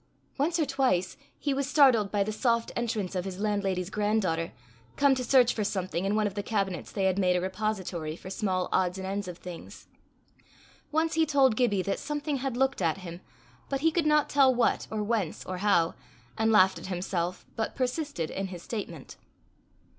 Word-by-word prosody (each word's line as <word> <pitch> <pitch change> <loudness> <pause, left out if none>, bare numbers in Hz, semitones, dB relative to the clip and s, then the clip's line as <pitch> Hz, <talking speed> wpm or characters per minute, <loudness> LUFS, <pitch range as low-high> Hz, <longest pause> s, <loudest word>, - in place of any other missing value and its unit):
Once 325 +5 +1
or 315 - +2
twice 260 -10 +1 0.2
he 285 - -1
was 275 0 -1
startled 255 -9 +5
by 205 -1 +2
the 215 - -3
soft 230 +1 0
entrance 220 -6 -2
of 180 -1 -1
his 190 0 -6
landlady's 200 -3 -1
grand 210 +1 +1
daughter, 165 -4 -1 0.4
come 280 -1 +4
to 255 -1 -2
search 250 -1 +4
for 215 - -1
something 185 -2 -2
in 200 +2 +1
one 215 0 +2
of 205 - -1
the 205 - -2
cabinets 195 -4 -2
they 195 - -2
had 190 0 +2
made 180 -2 +3
a - - +2
repository 185 -4 -3
for 185 - -10
small 185 -3 -1
odds 185 0 +1
and 190 - -5
ends 200 +1 -3
of 175 -2 -7
things. 180 -2 -10 1.0
Once 320 +1 +1
he 325 - +3
told 275 -6 +3
Gibbie 210 -6 +2
that 195 - -2
something 295 -1 -2
had 260 -2 -3
looked 265 -3 +1
at 165 0 +1
him, 175 -2 -8 0.5
but 275 -1 -1
he 325 +1 +4
could 320 -1 +1
not 300 -1 +4
tell 270 -2 +5
what 240 - +1
or 215 -1 -2
whence 210 -6 -2
or 185 - -4
how, 175 -5 +3 0.4
and 220 0 +2
laughed 190 -3 +5
at - - -8
himself, 180 -1 -3
but 220 - -2
persisted 255 - -2
in 195 0 -3
his 180 -2 -8
statement. 175 - -6
205 Hz, 200 wpm, -28 LUFS, 185-260 Hz, 1.0 s, startled